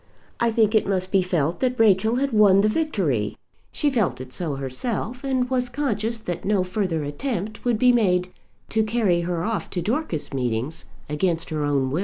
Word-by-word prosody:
I 235 - +3
think 220 -1 +2
it 220 - +3
must 185 -1 -1
be 195 - +4
felt 170 -3 0
that 255 -2 0
Rachel 220 +1 +4
had 275 0 0
won 200 -2 +6
the 210 - +3
victory. 190 - 0 0.3
She 295 -2 0
felt 225 - 0
it 130 0 -9
so 160 -6 -3
herself, 210 - -4
and 260 -2 0
was 250 -1 0
conscious 230 -4 -1
that 175 -5 -4
no 200 -2 +2
further 180 -4 -1
attempt 210 - -4
would 240 -3 +1
be 250 +3 +5
made 185 -6 +2 0.4
to 220 - +2
carry 215 -5 +1
her 170 -1 -2
off 220 +1 -2
to 180 - -2
Dorcas 220 - -2
meetings 125 +4 -2 0.2
against 165 +2 -1
her 155 -1 -1
own 140 -2 +1
will. 155 - 0
195 Hz, 190 wpm, -23 LUFS, 165-235 Hz, 0.4 s, won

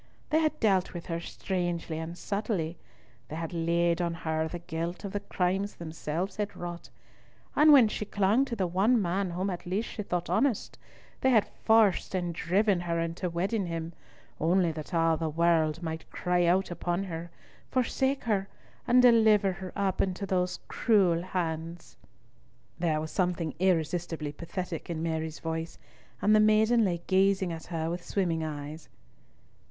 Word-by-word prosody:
They 310 - +4
had 310 -1 0
dealt 190 -4 +2
with 170 - -6
her 165 -2 -3
strangely 175 -2 -3
and 165 +2 -6
subtilly; 200 -6 -2 0.5
they 155 - -6
had 165 +1 -4
laid 170 +1 +1
on 170 -1 -1
her 160 -1 -1
the 175 - -5
guilt 170 +1 -4
of 200 - -4
the 205 - -1
crimes 195 0 -1
themselves 165 +3 -4
had 205 -1 -3
wrought; 175 -1 -7 0.7
and 305 +1 +7
when 265 -6 +8
she 210 - -3
clung 205 +5 +2
to 240 - -4
the 195 -4 0
one 195 +8 +3
man 190 0 0
whom 185 +3 -2
at 175 -1 -6
least 200 +6 -1
she 215 - -5
thought 180 -3 -2
honest, 265 -6 0 0.4
they 260 - +3
had 225 -5 +5
forced 220 -4 +2
and 175 -2 -1
driven 190 +3 +2
her 170 -1 -1
into 165 +2 -2
wedding 190 +4 -1
him, 165 0 -4 0.5
only 170 +1 +3
that 155 +1 -7
all 165 -2 +2
the 160 0 -2
world 165 0 +2
might 160 -1 -5
cry 180 -1 +1
out 185 +2 +2
upon 175 +2 -1
her, 170 -2 -6 0.4
forsake 265 +2 0
her, 200 -4 0 0.4
and 250 +1 +5
deliver 220 -5 +5
her 185 0 -7
up 195 -2 0
into 190 +1 -1
those 180 -1 -1
cruel 190 -7 +3
hands." 170 -2 -4 0.8
There 160 -3 +1
was 155 0 -5
something 175 -5 -1
irresistibly 165 -3 0
pathetic 170 +2 -6
in 165 -1 -3
Mary's 160 -1 -2
voice, 165 0 -4 0.5
and 215 +1 +5
the - - +6
maiden 215 +2 +4
lay 175 -4 -1
gazing 190 -1 +2
at 160 - -8
her 160 -2 -2
with 175 0 -4
swimming 170 -5 -1
eyes. 150 +1 -6
175 Hz, 165 wpm, -29 LUFS, 165-200 Hz, 0.8 s, when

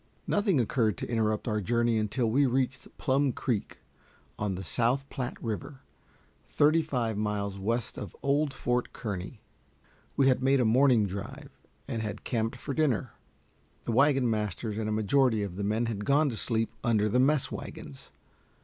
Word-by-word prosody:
Nothing 205 -7 +2
occurred 110 -4 +1
to - - -4
interrupt 110 -2 0
our 105 -2 0
journey 115 +2 +1
until 110 +4 0
we 135 +5 +3
reached 130 0 -1
Plum 135 +1 +2
Creek, 115 -3 -3 0.6
on 105 -3 -1
the 95 - -6
South 120 +9 +1
Platte 125 -2 -4
River, 130 +5 -5 0.6
thirty 155 +3 +3
five 120 -8 -2
miles 100 -2 -2
west 115 +3 -2
of 100 - -7
old 145 +1 +2
Fort 125 -2 -1
Kearny. 105 +1 -5 0.8
We 135 - +4
had 130 -1 +3
made 135 +1 +3
a 125 - +3
morning 120 -1 +4
drive, 135 +10 -7 0.4
and 115 -4 -3
had 105 -1 -5
camped 115 0 -1
for 135 +3 -5
dinner. 135 -8 +1 0.7
The - - -2
wagon 135 +1 +4
masters 105 0 -2
and 110 -1 -2
a - - -1
majority 110 +1 +2
of 95 -3 -5
the 100 - -3
men 110 +4 0
had 105 -3 -3
gone 145 +5 +3
to 120 - -4
sleep 115 0 -1
under 110 -3 +2
the 120 +4 +2
mess 140 +2 +2
wagons. 70 -2 -8
115 Hz, 165 wpm, -29 LUFS, 105-135 Hz, 0.8 s, We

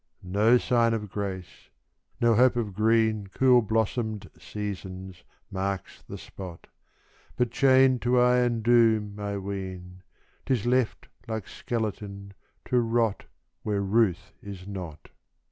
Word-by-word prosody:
No 110 +4 +5
sign 115 -2 +2
of 105 -3 -5
grace 95 -3 -6 0.5
no 120 -1 +4
hope 125 +2 +4
of 110 -5 -2
green, 110 0 +2
Cool 125 -2 +5
blossomed 110 -1 -2
seasons 95 -3 -7 0.3
marks 95 -1 -4
the - - -9
spot; 90 -4 -10 0.7
But 125 -2 0
chained 130 0 +4
to 125 +1 +2
iron 125 -2 +3
doom, 110 -3 +3
I 100 -1 -3
ween, 95 -2 -6 0.5
'Tis 125 -5 0
left, 125 -1 0 0.2
like 110 -3 -4
skeleton, 100 -3 -5 0.3
to 125 - +2
rot 115 -2 0 0.4
Where 105 -2 -1
ruth 100 -2 +1
is 100 -2 -9
not. 90 -7 -8
105 Hz, 120 wpm, -27 LUFS, 100-120 Hz, 0.7 s, No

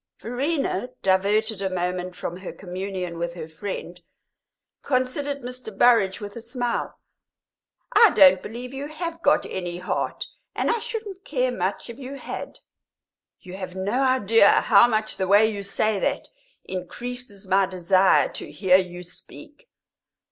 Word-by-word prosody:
Verena, 255 - -2
diverted 200 +2 +2
a 190 - 0
moment 180 0 -3
from 175 - -5
her 185 0 -7
communion 185 -2 -5
with 170 0 -3
her 160 -3 -6
friend, 175 +1 -6 0.8
considered 275 +2 -1
Mr. 250 -4 -7
Burrage 215 -6 +4
with 205 -1 -8
a 235 - -7
smile. 240 +1 -3 1.0
"I 455 - +8
don't 185 -2 +7
believe 245 +4 -7
you 275 +2 -5
have 330 +2 -5
got 290 - +3
any 175 -2 -4
heart, 180 - -3 0.3
and - - +1
I 465 - 0
shouldn't 430 -4 -6
care 255 -6 0
much 190 -4 -2
if 235 +1 -9
you 270 +1 -7
had!" 275 - -7 0.8
"You 185 0 -9
have 185 -1 -7
no 200 +7 -1
idea 230 -5 +5
how 215 +1 +6
much 215 -2 -1
the 190 - -1
way 205 +3 +6
you 205 -2 -5
say 200 +1 0
that - - -1 0.3
increases 210 +3 -6
my 190 0 +3
desire 185 +1 +3
to - - -7
hear 185 -2 +4
you 180 -1 -4
speak." 290 - -11
205 Hz, 150 wpm, -24 LUFS, 185-250 Hz, 1.0 s, I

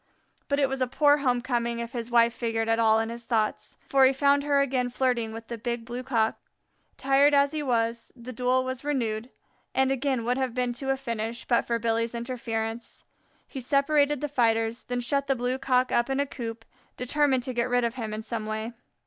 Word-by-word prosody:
But 280 - +1
it 280 -1 +3
was 265 0 -4
a 255 - +2
poor 290 +3 +4
home 250 -4 +1
coming 235 -2 -1
if 235 0 -5
his 235 -1 -4
wife 235 -1 +4
figured 225 -2 -2
at 225 0 +2
all 220 -1 +4
in 225 0 -1
his 235 0 -8
thoughts, 220 -3 -1
for 270 -1 +4
he 260 - +7
found 280 +1 +3
her 285 -1 +2
again 255 -3 +1
flirting 245 -3 0
with 225 +1 -8
the 235 0 -7
Big 235 0 -3
Blue 240 +1 -5
cock. 230 -4 0 0.6
Tired 275 +2 +4
as 280 0 +4
he 310 -1 -3
was, 230 -3 -1
the 250 0 -9
duel 250 +2 +1
was 260 0 -4
renewed, 240 -5 -2 0.5
and 265 0 +3
again 270 -3 -1
would 250 +2 0
have 260 -2 -2
been 250 -1 0
to 270 +3 -5
a 270 - +2
finish 230 -3 -4
but 240 - +1
for 235 - +1
Billy's 230 0 -1
interference. 230 -1 -4 0.4
He 270 - -7
separated 285 +2 +2
the 295 - -1
fighters, 230 -4 +1
then 245 0 -2
shut 280 +3 0
the 270 - +2
Blue 250 +1 -2
cock 255 -1 +1
up 240 +2 +1
in 270 +1 0
a 285 - +2
coop, 230 -4 -7 0.3
determined 260 0 +1
to 255 - -4
get 240 +1 0
rid 245 0 +2
of 235 -1 0
him 225 -4 -5
in 215 +1 -5
some 220 -1 -4
way. 220 +2 -4
245 Hz, 215 wpm, -27 LUFS, 230-270 Hz, 0.6 s, he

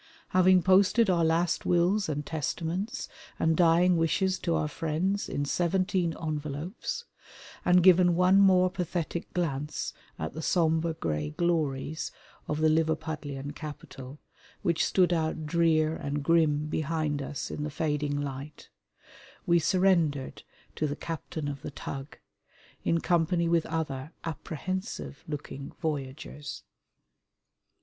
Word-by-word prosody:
Having 185 -1 +5
posted 195 +3 +5
our 170 -2 +2
last 165 +1 +1
wills 180 +3 +2
and 145 -1 -2
testaments 170 - -3 0.3
and 160 0 +2
dying 175 +1 +4
wishes 185 +3 +1
to 170 -2 0
our 150 - 0
friends 165 +6 -1
in 145 - -1
seventeen 180 +1 +1
envelopes, 155 - -4 0.6
and 180 0 +5
given 180 -1 +6
one 180 +2 +5
more 185 -2 +5
pathetic 175 -2 -3
glance 150 -4 -2 0.2
at 80 - -4
the 160 - -5
sombre 160 -1 +1
grey 75 - -2
glories 155 - -1 0.4
of 150 +1 -2
the 160 - +5
Liverpudlian 155 -3 -1
capital 145 -3 -9 0.5
which 170 -4 +2
stood 180 -2 +3
out 160 -1 -1
drear 160 -1 +2
and 145 0 -3
grim 150 -2 +3
behind 155 -1 -1
us 135 0 -5
in - - -4
the 150 - -2
fading 145 -1 -1
light, 140 +1 -6 0.8
we 170 0 +4
surrendered 165 -6 +2 0.3
to 155 - 0
the 145 - -3
captain 160 -2 -5
of 140 -2 -5
the - - -5
tug, 135 0 -7 0.7
in 165 0 +1
company 170 0 +2
with 165 -1 +2
other 150 -3 -3
apprehensive 170 - -5
looking 145 -2 -6
voyagers. 145 -2 -5
160 Hz, 125 wpm, -29 LUFS, 150-175 Hz, 0.8 s, given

